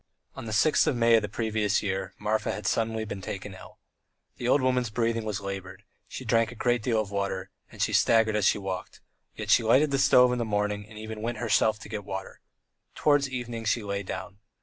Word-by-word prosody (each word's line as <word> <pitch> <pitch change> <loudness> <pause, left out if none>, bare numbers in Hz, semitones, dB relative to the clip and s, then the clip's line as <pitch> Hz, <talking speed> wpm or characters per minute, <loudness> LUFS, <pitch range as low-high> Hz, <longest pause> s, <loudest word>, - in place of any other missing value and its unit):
On - - -7
the 110 - -5
sixth 130 +9 +3
of 140 - +2
May 115 -1 +4
of 110 - +4
the 105 - -4
previous 110 -1 0
year 95 -2 -3
Marfa 105 +1 -1
had 105 - -6
suddenly 110 -1 0
been 100 -2 -6
taken 95 +1 -6
ill. 95 - -13 0.6
The 120 - -3
old 135 - +4
woman's 125 -2 +1
breathing 115 +1 -1
was 105 -1 -3
laboured, 95 0 -7 0.2
she 130 - -8
drank 115 0 +2
a - - -10
great 120 0 +1
deal 115 -1 +1
of 105 -2 -3
water, 100 -2 -3 0.2
and - - -2
she - - 0
staggered 110 -1 +4
as 105 -2 +1
she - - +4
walked, 95 -2 -6 0.4
yet - - -3
she - - +6
lighted 130 +6 +3
the 140 - +1
stove 125 -2 +6
in 125 - -1
the - - 0
morning 105 -1 -1
and 110 - -12
even 110 0 -7
went 120 +2 -3
herself 110 -2 +2
to - - -9
get 105 -1 -5
water. 95 -1 -7 0.5
Towards 145 -2 +2
evening 120 -3 -5
she 110 +1 0
lay 100 0 -3
down. 100 +1 -7
110 Hz, 220 wpm, -27 LUFS, 100-115 Hz, 0.6 s, she